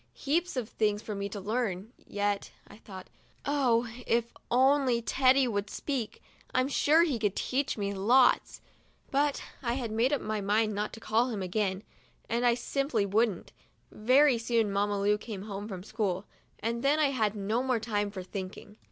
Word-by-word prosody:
'Heaps 325 +2 -1
of 240 -4 -2
things 210 -3 0
for 215 - -5
me 200 0 -3
to 205 - -6
learn 215 0 -2
yet," 205 -1 -1 0.2
I - - -14
thought. 190 -4 -11 0.2
" - - -28
Oh, 250 -5 +2 0.2
if 235 0 +1 0.2
only 260 -1 +3
Teddy 260 +2 +3
would 205 -3 -2
speak, 255 -4 -4 0.3
I'm 255 +1 +2
sure 310 +3 +4
he 285 -9 0
could 205 -3 0
teach 270 0 -1
me 200 -1 -2
lots! 240 +7 +3 0.2
' - - -35
But 285 +1 +1 0.2
I 235 -3 -1
had 240 -4 -3
made 230 +5 +2
up 290 - +1
my 215 -1 -3
mind 215 +2 +1
not 210 +1 -2
to 225 - -8
call 225 +3 +1
him 210 -5 -3
again, 190 +1 -1 0.4
and 235 +2 +1
I 235 - +4
simply 255 -3 -1
wouldn't. 210 -1 0 0.4
Very 255 +3 +4
soon 230 -2 +1
Mamma 205 0 0
Lu 205 +1 +2
came 210 -4 -7
home 205 -1 -6
from 185 -4 -7
school, 205 -3 -2 0.4
and 235 +2 -2
then 285 +2 +3
I 300 -3 +3
had 220 -5 0
no 210 +4 -1
more 255 -2 0
time 210 -2 -1
for 195 -2 -7
thinking. 190 +2 -8
225 Hz, 185 wpm, -29 LUFS, 205-255 Hz, 0.4 s, sure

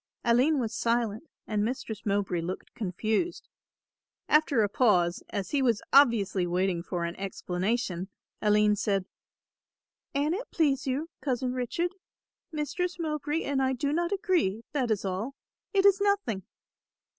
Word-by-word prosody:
Aline 250 +6 +4
was 230 -2 -2
silent 230 +3 0 0.2
and 210 -1 0
Mistress 220 -3 -4
Mowbray 195 -4 0
looked 180 +3 -6
confused. 220 - -2 0.8
After 300 -6 +4
a - - +3
pause, 185 -6 +2
as 200 -3 -4
he 285 - +2
was 235 -5 +2
obviously 225 -9 +5
waiting 180 0 0
for 170 0 -3
an 170 +1 -4
explanation, 190 0 -2 0.3
Aline 210 0 +4
said, 195 -2 0 1.1
"An 290 +3 +2
it 435 +7 -4
please 280 -5 +1
you, 290 +6 -2
Cousin 255 -2 -1
Richard, 255 +8 -1 0.6
Mistress 330 +4 -2
Mowbray 305 -1 -2
and 275 -1 0
I 265 0 +2
do 280 +3 -1
not 345 +3 0
agree, 355 - +1
that 260 -5 0
is 210 -2 0
all, 195 +8 -3 0.4
it 390 -1 +3
is 400 0 +6
nothing." 380 - 0
235 Hz, 140 wpm, -28 LUFS, 200-295 Hz, 1.1 s, is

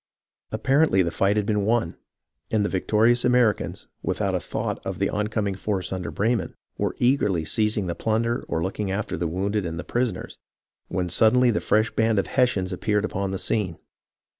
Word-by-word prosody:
Apparently 135 -8 +3
the 85 - -1
fight 100 +5 +1
had 105 - +1
been 105 -1 +1
won; 110 -5 +1 0.5
and 105 -2 +1
the - - 0
victorious 110 +5 +2
Americans, 125 -3 +2 0.2
without - - -1
a - - +1
thought - - -4
of - - -4
the - - 0
oncoming 105 -1 -1
force 95 -1 -3
under 90 -1 -4
Breyman, 115 +3 0 0.2
were - - -2
eagerly 105 - +2
seizing 105 +3 0
the 85 - -2
plunder 115 +5 0
or 80 - -1
looking 95 +2 -2
after 100 +2 -2
the 85 +1 -1
wounded 100 +5 -1
and 80 -1 -4
the - - -4
prisoners, 120 -6 -2 0.5
when 90 0 -2
suddenly 115 +7 +4
the 110 - -1
fresh 110 +1 +2
band 110 -1 +1
of 100 - +2
Hessians 100 -8 +1
appeared 105 +2 0
upon 100 -2 -2
the 95 - -2
scene. 95 -4 -1
105 Hz, 180 wpm, -24 LUFS, 95-115 Hz, 0.5 s, suddenly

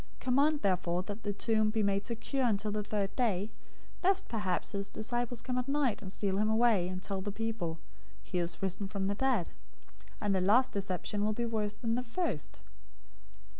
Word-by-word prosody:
027:064 - - -26
Command 285 +4 +3
therefore 180 -2 +1
that 205 +3 -6
the 205 - -1
tomb 215 +1 +2
be 215 0 +1
made 200 0 +2
secure 245 +3 0
until 210 -1 +1
the 210 0 0
third 200 -1 -1
day, 215 -4 +1 0.5
lest 385 +1 +3
perhaps 205 -6 -1
his 200 -1 -3
disciples 240 +1 -2
come 250 -1 -1
at 250 - -3
night 275 -5 +1
and 190 -2 -6
steal 195 -1 0
him 215 +1 +3
away, 220 -5 +4
and 185 0 -5
tell 195 -1 -2
the 205 +1 -3
people, 210 -6 -2 0.5
'He 180 - -2
is 170 +2 -2
risen 195 +1 -1
from 195 -1 -2
the 200 - +1
dead;' 235 -5 +1 0.7
and 205 -1 +1
the 190 - +2
last 225 +8 +5
deception 200 +1 -2
will 215 +1 +2
be 235 +2 -1
worse 215 -2 -1
than 230 +1 -1
the 245 - +1
first." 230 - -3
210 Hz, 195 wpm, -32 LUFS, 195-235 Hz, 0.7 s, last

